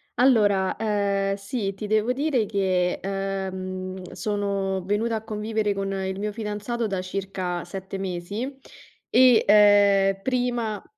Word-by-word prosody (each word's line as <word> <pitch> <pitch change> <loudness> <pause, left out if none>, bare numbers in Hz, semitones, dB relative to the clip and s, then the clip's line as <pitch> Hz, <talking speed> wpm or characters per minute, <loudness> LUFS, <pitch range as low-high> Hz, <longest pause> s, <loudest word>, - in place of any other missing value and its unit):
Allora, 210 -7 +3
ehm, 200 -2 0
sì, 200 0 -3
ti 205 +2 -6
devo 215 +3 +2
dire 270 -5 +1
che, 185 -3 0
ehm, 190 -1 -4
sono 195 0 -2
venuta 220 +3 0
a 220 - -4
convivere 215 -1 -1
con 195 0 -3
il 190 0 -3
mio 210 0 -2
fidanzato 220 +2 -3
da 190 -2 -2
circa 185 -2 -4
7 190 +2 -6
mesi 195 +9 -4 0.5
e, 250 -2 +6
ehm, 200 -1 +5
prima 240 -4 -1
200 Hz, 125 wpm, -25 LUFS, 190-220 Hz, 0.5 s, e